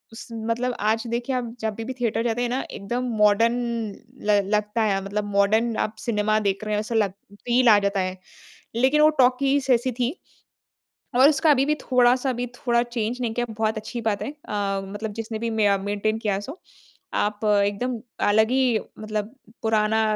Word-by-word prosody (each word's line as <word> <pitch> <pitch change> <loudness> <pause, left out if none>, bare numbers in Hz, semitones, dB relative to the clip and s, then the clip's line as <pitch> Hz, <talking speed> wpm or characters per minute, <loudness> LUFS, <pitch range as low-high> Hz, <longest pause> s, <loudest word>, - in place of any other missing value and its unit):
स 225 - -9
मतलब 230 +3 -2
आज 220 +2 +1
देखिए 240 +3 -2
आप 240 -2 -3
जभी 220 0 -3
भी 260 - -4
थिएटर 230 -1 0
जाते 235 0 -1
हैं 245 - 0
ना 255 +2 -1
एकदम 240 +6 -3
मॉडर्न 210 +3 +4 0.7
ल 205 -1 +5 0.2
लगता 210 +2 -1
है 195 -2 +1
मतलब 205 +1 -2
मॉडर्न 220 +4 +2
आप 215 - -1
सिनेमा 215 -2 +1
देख 195 +2 -3
रहे 215 0 -2
हैं 210 - +1
ऐसा 220 +2 -4
लग 210 -4 +2 0.3
फ़ील 245 0 +4
आ 210 - +8
जाता 200 0 0
है। 185 0 -2 0.6
लेकिन 265 +5 +3
वो 305 - +7
टॉकीज़ 270 +2 +3
ऐसी 245 +2 +1
थी, 245 +1 -1 1.0
और 260 +3 +7
उसका 310 +1 +3
अभी 270 -1 +3
भी 300 +1 +1
थोड़ा-सा 250 +1 +3
भी 245 +1 -3
थोड़ा 235 -1 +1
चेंज़ 240 0 -3
नहीं 230 -2 -1
किया 240 +1 -1
बहुत 220 0 -1
अच्छी 225 +2 -5
बात 220 -3 -1
है - - -4
अ, 205 -9 -3
मतलब 205 +2 -5
जिसने 225 0 -5
भी 230 0 -2
मे 210 -3 +2
मेंटेन 205 +2 -1
किया 205 -3 -1
सो। 275 - -8 0.6
आप 210 +1 -1
एकदम 210 +4 +1 0.3
अलग 220 +2 +4
ही 255 -4 +3 0.2
मतलब 215 -1 -3 0.4
पुराना 220 0 +2
225 Hz, 185 wpm, -24 LUFS, 210-245 Hz, 1.0 s, आ